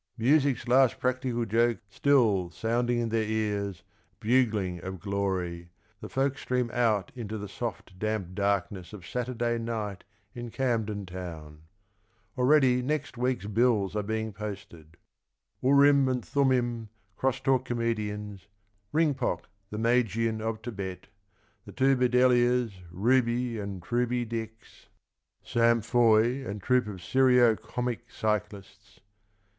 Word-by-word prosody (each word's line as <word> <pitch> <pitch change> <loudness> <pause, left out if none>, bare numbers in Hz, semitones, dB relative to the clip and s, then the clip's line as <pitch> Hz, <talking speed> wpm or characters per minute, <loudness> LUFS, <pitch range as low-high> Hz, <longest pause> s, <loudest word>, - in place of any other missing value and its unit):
Music's 135 +1 +2
last 130 0 +4
practical 125 -2 -1
joke 115 +2 +2
Still 105 -5 +2
sounding 120 +5 0
in 120 -1 -1
their 110 0 +1
ears, 105 -4 -2 0.4
bugling 105 -7 +1
of 95 -1 -6
glory. 95 -3 -2 0.3
The - - -8
folk 135 +1 0
stream 125 -2 -1
out 110 -6 +1
into 110 -3 -5
the 105 0 -6
soft 100 -3 -6
damp 110 -4 -2
darkness 100 -1 -1
Of 95 -4 -9
Saturday 120 0 -2
night 110 -4 -4 0.3
in 120 -1 -6
Camden 110 -5 -1
Town. 80 -4 -8 0.7
Already 130 -1 +4
next 145 +1 -2
week's 125 -3 -1
bills 105 -2 +1
are 105 - +1
being 110 +1 -3
posted: 95 -6 -8 0.3
— - - -52
Urim 140 0 +5
and 125 -1 -2
Thummim, 120 -5 +1 0.3
cross 130 +2 0
talk 130 -1 +1
comedians, 105 -4 -3 0.4
Ringpok, 145 -5 +1 0.3
the 105 - -6
Magian 115 -1 +1
of 110 0 -3
Thibet, 95 -5 -6 0.6
The - - -10
Two 135 0 +3
Bedelias, 125 -1 +3 0.2
Ruby 120 +4 +1
and 100 -3 -6
Truby 120 +3 0
Dicks, 110 -1 -7 0.6
Sam 115 0 +3
Foy 120 +2 +3
and 105 -4 -5
Troupe 125 +1 +2
of 95 -4 -7
Serio 125 +1 +4
Comic 120 +2 -4
CycUsts 105 -2 -4
115 Hz, 125 wpm, -28 LUFS, 100-125 Hz, 0.7 s, Urim